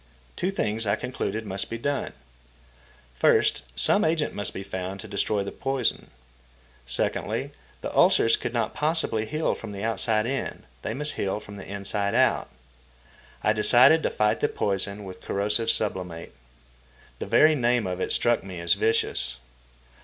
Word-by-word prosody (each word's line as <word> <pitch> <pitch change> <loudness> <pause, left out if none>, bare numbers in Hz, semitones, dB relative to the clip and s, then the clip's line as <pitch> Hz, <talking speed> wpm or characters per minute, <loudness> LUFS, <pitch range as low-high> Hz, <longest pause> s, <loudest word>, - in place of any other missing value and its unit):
Two 185 - -1
things 110 - -1
I 100 - +3
concluded 110 -3 -4
must 100 -1 -3
be 115 - -3
done. 140 +4 -2 1.0
First, 60 - +3
some - - +4
agent 160 -1 +1
must 100 -1 -2
be 95 - -6
found 95 0 -5
to - - -9
destroy 100 +1 0
the 100 - -5
poison. 135 -1 -1 0.8
Secondly, - - -1 0.3
the - - -5
ulcers 115 - +5
could - - -4
not 115 -2 -1
possibly 150 -8 0
heal 155 +4 0
from 110 -2 -8
the 100 +1 -6
outside 110 0 +1
in; 135 +3 -3 0.2
they - - -3
must 150 +1 -2
heal 100 +1 -1
from 100 -1 -11
the 95 - -9
inside 100 0 -2
out. - - +2 0.9
I 105 - +3
decided 125 +8 +6
to - - 0
fight 105 0 +1
the - - +1
poison 100 +1 -1
with 95 -2 -9
corrosive 105 +3 0
sublimate. 90 -7 -2 0.9
The - - -4
very 150 +9 +6
name 120 -5 +1
of 90 0 -3
it - - -1
struck 120 -1 +2
me 95 -2 -7
as 85 0 +3
vicious. 100 - 0
105 Hz, 160 wpm, -26 LUFS, 100-120 Hz, 1.0 s, decided